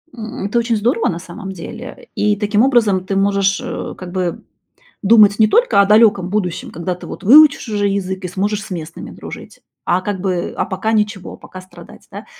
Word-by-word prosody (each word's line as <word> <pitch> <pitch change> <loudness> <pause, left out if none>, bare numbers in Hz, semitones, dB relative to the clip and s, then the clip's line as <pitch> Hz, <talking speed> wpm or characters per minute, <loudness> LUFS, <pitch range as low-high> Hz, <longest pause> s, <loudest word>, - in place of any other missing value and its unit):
М, 220 -3 -6
это 215 +4 0
очень 230 0 0
здорово, 230 +2 0
на 170 - -4
самом 190 +3 -9
деле. 225 +8 -10
И 210 0 +1
таким 210 +1 0
образом 225 -8 +2
ты 195 - -3
можешь, 195 0 +1
э, - - -5
как 180 -1 -9
бы 180 -2 -3 0.6
думать 210 -1 +5
не 215 - +6
только 480 - +3
о - - +3
далеком 210 -3 +4
будущем, 185 -4 -3
когда 175 +2 -4
ты 180 - -12
вот - - -9
выучишь 285 +2 +6
уже 205 -1 0
язык 190 -1 -3
и - - -2
сможешь 205 +4 -2
с - - -12
местными 165 -2 -7
дружить, - - -11 0.2
а 180 - +1
как 200 0 -4
бы, 180 -2 -2
а - - 0
пока 210 +4 -3
ничего, 210 -3 -2
пока 185 - -11
страдать, 185 - -15
да. - - -9
200 Hz, 200 wpm, -17 LUFS, 185-220 Hz, 0.6 s, не